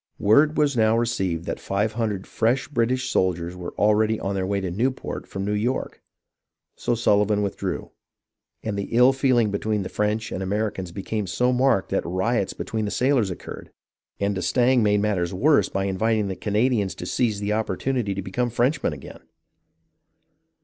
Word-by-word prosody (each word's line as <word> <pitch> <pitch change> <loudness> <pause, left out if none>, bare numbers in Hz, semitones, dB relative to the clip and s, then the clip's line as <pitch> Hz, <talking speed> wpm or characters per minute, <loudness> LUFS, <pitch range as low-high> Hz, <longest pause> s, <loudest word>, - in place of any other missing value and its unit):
Word 145 +9 +4
was 145 -3 +2
now 110 -1 +3
received 95 -8 -1
that - - -4
five 105 +2 -1
hundred 105 -4 -2
fresh 120 +4 0
British 130 -1 0
soldiers 90 -1 0
were 90 -1 -7
already 110 +1 +2
on 95 - -2
their 95 -1 -1
way 100 0 0
to 95 -2 -3
Newport 125 +8 -2
from 95 0 -4
New 105 - -1
York, 115 +5 -2 0.7
so 120 - -1
Sullivan 105 -2 +2
withdrew, 100 - -4 0.7
and 110 -2 -2
the 100 - -4
ill 125 +2 +6
feeling 130 -5 +2
between 105 0 -1
the - - -5
French 105 +1 -1
and - - -4
Americans 95 -2 -2
became 100 +2 -3
so 125 +8 +1
marked 125 -6 +2
that - - +1
riots 95 +4 -1
between 110 -1 -3
the - - -2
sailors 125 -3 +2
occurred; 90 - -8 0.5
and 100 0 0
d'Estaing 120 +7 +2
made 105 -1 +3
matters 95 -4 0
worse 145 +9 +3
by 95 - -1
inviting 105 +2 0
the 95 - -3
Canadians 105 -3 0
to 90 - -7
seize 110 +1 0
the 105 +1 -1
opportunity 110 +1 -1
to 100 - -4
become 120 +7 -1
Frenchmen 125 +6 0
again - - -11
105 Hz, 170 wpm, -24 LUFS, 95-120 Hz, 0.7 s, ill